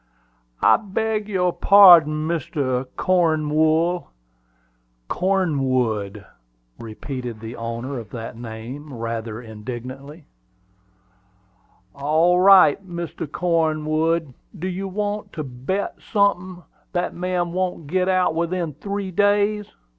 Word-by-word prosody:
"I - - +6
beg 215 +1 -2
your 180 -3 +1
parding, 165 -6 +6
Mr. 140 -6 -2
Cornwool." 160 0 +1 1.0
"Cornwood," 130 - 0 0.5
repeated 120 +1 -7
the 115 +2 -8
owner 115 +3 -5
of 110 -4 -10
that 115 0 -7
name, 120 +6 -8
rather 115 -1 -4
indignantly. 125 +7 -9 1.7
"All 160 +5 +2
right, 190 -2 +6
Mr. 170 -4 -6
Cornwood. 160 -2 0 0.2
Do 180 +2 -4
you 190 +1 -4
want 205 +1 -4
to 155 - -4
bet 135 +10 -4
sunthin' 185 -3 0 0.3
that 180 -1 -1
man 180 -1 -2
won't 180 -3 -2
git 185 +5 0
out 185 -3 +2
within 170 -1 -2
three 200 +5 -5
days?" 205 +2 +2
165 Hz, 100 wpm, -22 LUFS, 130-185 Hz, 1.7 s, I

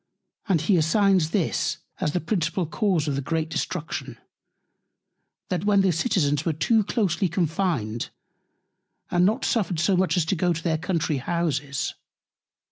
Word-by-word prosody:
And 175 -6 +3
he 180 +3 +3
assigns 185 +1 +3
this, 160 -5 0 0.2
as 150 - -1
the 180 - +1
principal 175 0 -1
Cause 175 -2 0
of 145 - 0
the 140 - -1
great 160 +3 -2
Destruction, 165 +1 -4 1.3
That 180 -1 -1
the 200 -2 +4
Citizens 155 - +1
were 165 - 0
too 220 +8 +2
closely 195 -4 0
confined, 160 - -1 1.0
and 175 +1 +4
not 215 - 0
suffered 185 -7 0
so 185 +3 +3
much 185 0 +2
as 170 - +2
to 175 - 0
go 175 0 +1
to 165 0 -6
their 160 -2 0
Country 165 -4 -1
Houses. 145 -2 -2
170 Hz, 145 wpm, -25 LUFS, 155-190 Hz, 1.3 s, the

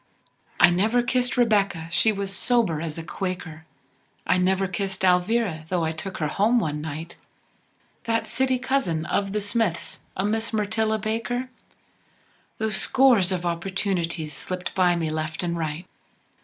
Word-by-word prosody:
I 175 - +7
never 220 +7 +2
kissed 250 +1 +1
Rebecca, 200 -8 +2
she 220 +6 +3
was 200 -1 -3
sober 215 -12 +1
as 160 -2 -4
a 165 - -5
Quaker, 165 -3 -5 0.6
I 185 - +3
never 190 +1 +2
kissed 190 0 -2
Alvira, 180 -2 +2
though 175 -3 +1
I 160 - 0
took 185 +4 -5
her 155 - -1
home 210 +10 +2
one 150 -8 -1
night, 160 +2 -6 0.9
That 230 0 0
city 260 -1 +1
cousin 250 -12 0
of 195 -1 0
the 210 - 0
Smiths, 205 -4 -1 0.2
a 190 - 0
Miss 225 +2 -1
Myrtilla 220 +1 +1
Baker, 230 +4 -2 1.1
Though 220 -1 -1
scores 215 -2 +4
of 180 -1 -2
opportunities 170 -3 -2
slipped 180 +5 -5
by 180 -2 +3
me, 165 -2 -1
left 155 +2 -2
an' 170 -1 -1
right. 160 +1 -3
190 Hz, 150 wpm, -25 LUFS, 170-220 Hz, 1.1 s, I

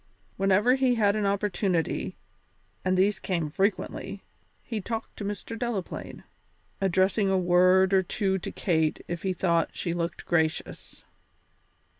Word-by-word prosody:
Whenever 195 +5 +3
he 260 -2 +2
had 205 -3 +3
an 210 -2 0
opportunity, 195 -3 -1 0.7
and 185 0 +1
these 195 +1 +2
came 170 -5 -1
frequently, 195 +6 -2 0.4
he 225 -3 -4
talked 225 +3 -5
to - - -7
Mr. 205 +3 -5
Delaplaine, 225 -5 -4 0.6
addressing 195 +2 +2
a 190 - +3
word 185 +1 +4
or 190 - +5
two 190 +1 -1
to - - -5
Kate 160 -4 0
if 175 -1 -4
he 190 - -1
thought 170 -2 +1
she 170 - -2
looked 170 -1 -3
gracious. 160 -2 -2
190 Hz, 135 wpm, -27 LUFS, 175-205 Hz, 0.7 s, or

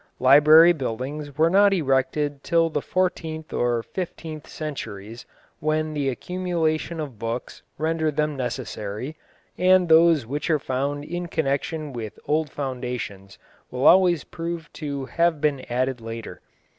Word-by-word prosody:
Library 150 +6 +7
buildings 140 +2 -5
were 160 +2 +4
not 200 +1 +5
erected 140 -1 0
till 165 -1 +2
the 150 - -1
fourteenth 160 -3 -2
or 120 -1 0
fifteenth 160 - -6
centuries, 115 -7 -7 0.3
when 155 0 0
the 145 -2 0
accumulation 170 +1 -2
of 140 -8 -6
books 115 +2 -5 0.2
rendered 160 -1 0
them 150 0 0
necessary, 125 0 -4 0.4
and 185 0 +5
those 160 -4 +6
which 145 +8 -3
are 155 - +4
found 140 +2 -2
in 175 +2 -4
connection 150 0 -2
with 110 -3 -6
old 155 0 0
foundations 125 -8 -5 0.3
will 125 +1 -2
always 180 -3 +6
prove 165 -1 -6
to 140 -3 -4
have 170 +2 +1
been 145 -2 +1
added 130 0 0
later. 115 0 -7
150 Hz, 130 wpm, -24 LUFS, 130-165 Hz, 0.4 s, Library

